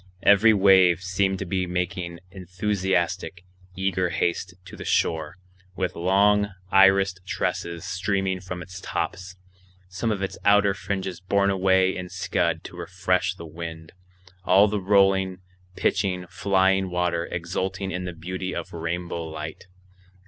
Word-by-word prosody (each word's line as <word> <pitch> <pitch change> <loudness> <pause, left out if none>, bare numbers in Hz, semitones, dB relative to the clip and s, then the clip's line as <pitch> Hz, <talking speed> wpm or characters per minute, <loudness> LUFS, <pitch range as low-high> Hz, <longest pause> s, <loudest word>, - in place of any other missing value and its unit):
Every 100 +3 +6
wave 95 -4 +5
seemed 95 +1 0
to 100 - -4
be 95 0 -1
making 90 -1 -3
enthusiastic, 95 -1 -2 0.3
eager 95 -2 0
haste 85 +1 -1
to - - -10
the - - -8
shore, 80 +1 0 0.4
with 90 0 -2
long, 100 +3 +3 0.2
irised 95 -1 +5
tresses 85 -2 -3
streaming 95 0 -1
from 90 -1 -6
its 95 +1 -10
tops, 95 0 -4 0.5
some 95 +5 -2
of 100 -3 -1
its 95 - -4
outer 100 -1 +4
fringes 95 -2 -4
borne 100 +1 +2
away 95 0 +3
in 90 -1 -6
scud - - -1
to - - -10
refresh 90 0 -1
the 85 - -9
wind, 80 0 -8 0.5
all 95 +3 +5
the 105 -1 -2
rolling, 95 -1 +3 0.4
pitching, 95 -2 0
flying 95 0 +2
water 90 -1 -1
exulting 95 +3 -3
in 90 0 -4
the 90 - -5
beauty 90 +3 -5
of - - -6
rainbow 85 +1 -3
light. 80 +2 -7
95 Hz, 135 wpm, -25 LUFS, 90-95 Hz, 0.5 s, Every